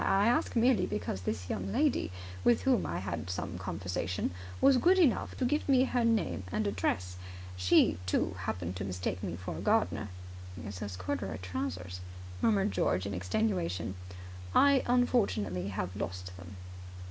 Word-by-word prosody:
I 195 +1 +3
ask 245 - +1
merely 240 +1 +4
because 105 -2 -3
this 90 0 -3
young 95 -1 -3
lady, 85 - +1 0.3
with 115 -4 +4
whom 85 -2 +3
I 85 +3 -2
had 90 -2 -4
some 90 0 -4
conversation, 90 0 -2 0.3
was 275 -2 +6
good 360 +9 +5
enough 310 -11 +2
to 255 - 0
give 295 +3 0
me 260 -2 +6
her 250 -2 +1
name 225 - +1
and 215 - 0
address. 90 - -1 0.4
She, 90 -1 +4
too, - - +1
happened 90 0 -3
to 95 - -3
mistake 90 -1 -3
me 85 - -3
for 95 +2 -6
a - - -5
gardener." 215 - +1 0.6
"It's 100 -3 -6
those 100 -3 -5
corduroy 90 -1 -3
trousers," 90 0 -4 0.4
murmured 205 -2 +3
George 90 +1 +1
in 100 - -3
extenuation. 90 - -1 0.6
"I 280 - +7
have - - -1
unfortunately 110 - +1 0.2
lost 90 -2 -5
them." 95 +1 -10
95 Hz, 160 wpm, -31 LUFS, -, 0.6 s, I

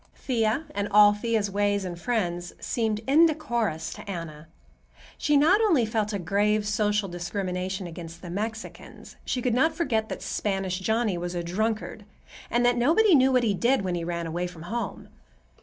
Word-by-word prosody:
Thea, 230 +2 0
and 205 0 -2
all 205 0 +7
Thea's 210 -1 -1
ways 205 0 0
and 175 -1 -4
friends, 175 -7 -2
seemed 220 -3 -1
indecorous 250 - +2
to - - -10
Anna. 165 -4 -6 0.7
She 295 -1 +2
not 345 +9 +5
only 335 - +3
felt 220 -1 -1
a 205 - -1
grave 205 +3 +1
social 210 -1 +1
discrimination 185 +1 -3
against 170 0 -9
the 175 - -7
Mexicans; 220 +4 -6
she 250 - -2
could 250 - +1
not 315 +6 +2
forget 225 -10 0
that - - -6
Spanish 195 -2 -2
Johnny 220 -2 0
was 175 +1 -4
a 175 - -2
drunkard 215 +4 -2 0.5
and 240 +1 +2
that 245 0 +3
"nobody 340 - +4
knew 265 -2 +5
what 250 -1 +3
he 215 -3 +2
did 240 +4 +2
when 185 -2 -2
he 170 -1 -2
ran 170 0 -3
away 175 +2 -2
from 170 -2 -11
home." 230 +7 -4
210 Hz, 175 wpm, -26 LUFS, 180-240 Hz, 0.7 s, all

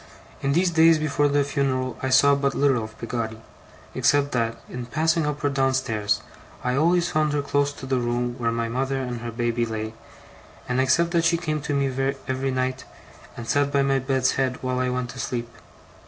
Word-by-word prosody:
In 140 0 +1
these 175 +3 +2
days 165 0 +6
before 150 -1 +1
the 145 0 +2
funeral, 130 -2 -1
I 130 - -1
saw 135 +2 +6
but 140 -1 0
little 135 -5 +2
of 110 0 -9
Peggotty, 115 -2 -4 0.5
except 145 0 +2
that, 115 -2 0
in 125 -1 -6
passing 160 +3 +1
up 150 0 -3
or 145 - +3
down 135 -1 +1
stairs, 110 -5 0 0.4
I 125 0 0
always 170 +4 +2
found 155 -1 +1
her 145 -1 0
close 145 0 +1
to 130 - -9
the 130 -1 0
room 120 0 -1
where 115 -1 +1
my 115 0 -1
mother 135 +3 -1
and 125 -3 -4
her 120 - -4
baby 120 0 -1
lay, 110 -1 -3 0.7
and 125 +1 +1
except 170 +6 +2
that 170 -1 +2
she 170 +1 +3
came 155 -3 -2
to 145 0 -2
me 135 0 0
every 130 +1 -1
night, 130 0 -1 0.5
and 120 -1 -7
sat 140 +4 +2
by 140 -1 +3
my 135 0 +2
bed's 130 0 +1
head 130 -1 0
while 130 0 -1
I 130 0 +1
went 125 -1 -2
to - - -10
sleep. 120 -1 -3
135 Hz, 205 wpm, -24 LUFS, 125-145 Hz, 0.7 s, days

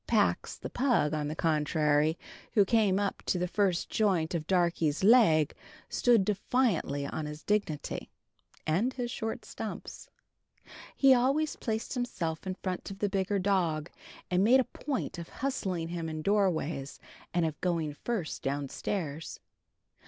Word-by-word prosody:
Pax, - - +1
the - - -7
pug, 245 - +2
on 150 -1 -1
the 155 - -4
contrary, 155 0 +2 0.4
who 205 -3 +6
came 205 -2 +3
up 200 -1 -2
to - - +2
the 180 0 0
first 190 -2 +1
joint 185 -7 +1
of 160 -2 -2
Darkie's 170 -4 +1
leg, 195 - +6 0.4
stood 235 -6 +3
defiantly 200 - 0
on 150 +2 -4
his 150 +1 -8
dignity 200 -8 -1 0.6
(and 195 +12 +1
his 245 -2 -3
short 225 -2 -4
stumps). - - -7 0.9
He 270 -1 +6
always 275 +5 +2
placed 220 -1 -3
himself 190 - -3
in 185 - -2
front 185 -1 -4
of 195 - -7
the 205 0 0
bigger 195 +1 0
dog, 175 -5 0 0.4
and 180 +1 +3
made 250 +5 +6
a - - +4
point 265 -8 -4
of 170 - -7
hustling 190 -11 -2
him 170 -2 -3
in 155 0 -5
doorways 165 -8 0 0.3
and 175 -1 +1
of 155 -2 -4
going 165 -4 0
first 190 +1 -3
downstairs. 145 +3 -3
180 Hz, 145 wpm, -30 LUFS, 155-215 Hz, 0.9 s, who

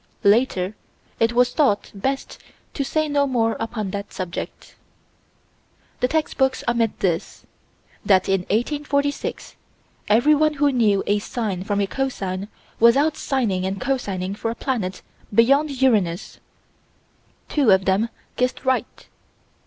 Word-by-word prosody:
Later 205 -2 +2 0.4
it 225 +1 +2
was 245 +1 +3
thought 265 -10 +1
best 265 +7 -3 0.3
to 280 - -1
say 310 +3 0
no 285 -1 +1
more 230 -4 +1
upon 220 -3 -3
that 200 +1 -5
subject. 185 -2 -6 1.3
The 250 - +2
text 315 +2 -1
books 265 0 +2
omit 235 -2 0
this: 175 -3 -2 0.6
That, 190 -2 +3
in 195 0 +2
1846, 285 +5 -1 0.5
everyone 300 +7 +4
who 290 0 +2
knew 215 -6 +2
a 205 +1 +2
sine 205 -4 -3
from 200 +1 -1
a 200 - +2
cosine 195 -6 -3 0.3
was 235 +2 +6
out 305 +2 +3
sining 230 -12 -1
and 190 +1 -2
cosining 200 -8 -2
for 225 - -3
a 230 - -3
planet 220 -8 -3 0.3
beyond 275 +6 +3
Uranus. 195 -9 +1 1.1
Two 285 -6 +2
of 190 -1 +5
them 195 +4 +2 0.3
guessed 250 +2 -1
right. 260 -1 -1
230 Hz, 130 wpm, -22 LUFS, 195-270 Hz, 1.3 s, was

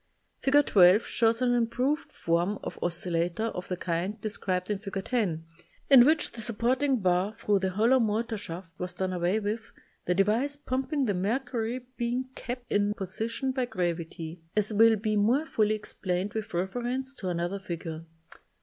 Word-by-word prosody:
Fig. 290 +1 +4
12 185 +2 +6
shows 230 +1 +2
an 245 -1 +3
improved 245 +5 0
form 170 +5 0
of - - -6
oscil 175 +1 0
lator 175 +7 0
of 180 - -6
the 180 - -3
kind 180 +5 -2
described 190 -3 -2
in 205 - -1
Fig. 195 -2 -5
10, 190 -10 -1 0.5
in 250 -3 +10
which 310 0 +2
the 230 - -7
supporting 250 +4 +1
bar 185 +3 +1
thru 205 -1 +2
the 190 0 0
hol 210 +5 +2
low 260 0 +5
motor 225 0 0
shaft 180 -3 -7
was 180 0 -4
done 185 0 -2
away 180 +4 +1
with, 220 +2 -4 0.3
the 180 - +1
device 220 +9 +2
pumping 270 0 -1
the 205 - +1
mercury 235 +4 -2
being 245 +2 -1
kept 245 -1 -6
in 205 0 +2
position 225 +7 -2
by 260 -1 -1
gravity, 170 -5 -4
as 215 +1 +2
will 225 +2 +6
be 215 0 -1
more 235 +9 +3
fully 215 -7 +1
explained 200 -2 -3
with 220 0 -4
reference 245 +9 -2
to 190 -9 -5
another 175 +3 -2
figure. 165 -3 -6
210 Hz, 170 wpm, -28 LUFS, 180-245 Hz, 0.5 s, in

